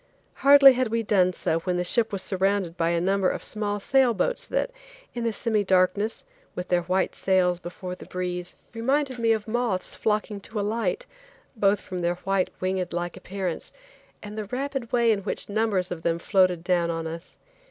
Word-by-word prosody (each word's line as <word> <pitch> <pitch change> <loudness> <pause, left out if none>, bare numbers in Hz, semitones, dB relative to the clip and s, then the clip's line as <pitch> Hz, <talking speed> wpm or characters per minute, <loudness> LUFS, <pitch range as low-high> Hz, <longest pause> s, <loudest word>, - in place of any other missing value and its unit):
Hardly 280 -1 +8
had 255 0 0
we 230 +1 -1
done 190 -4 +3
so 165 -2 -1
when 180 +1 -2
the 180 - 0
ship 225 +5 +2
was 195 -2 -3
surrounded 190 -2 0
by 165 -1 +1
a 170 0 +1
number 190 +1 +2
of - - -4
small 205 -1 -3
sail 255 +2 +3
boats - - -1
that, - - -1 0.4
in 240 - -4
the 230 - +1
semi 215 -1 0
darkness, 190 +3 +1 0.3
with 180 0 -5
their 180 -1 +3
white 185 +2 0
sails 180 -2 +2
before 180 +1 -7
the 180 - -11
breeze, 180 -1 -4 0.2
reminded 260 +2 0
me 230 -1 +3
of 220 -1 0
moths 220 -5 -1
flocking 210 -1 -1
to 215 +2 -6
a 200 - -1
light, 215 -4 -1 0.5
both 205 -2 +3
from 185 - -6
their 175 0 0
white, 195 -1 +1
winged 185 -1 -2
like 175 0 -3
appearance, 190 -3 -4 0.5
and 210 0 -8
the 215 - -3
rapid 260 +2 -4
way 235 -2 +4
in 210 - +1
which 200 - -3
numbers 205 -3 0
of 175 -2 -4
them 165 0 0
floated 185 -1 +2
down 175 -1 +1
on 165 -1 -3
us. 165 +2 -7
195 Hz, 195 wpm, -25 LUFS, 180-225 Hz, 0.5 s, Hardly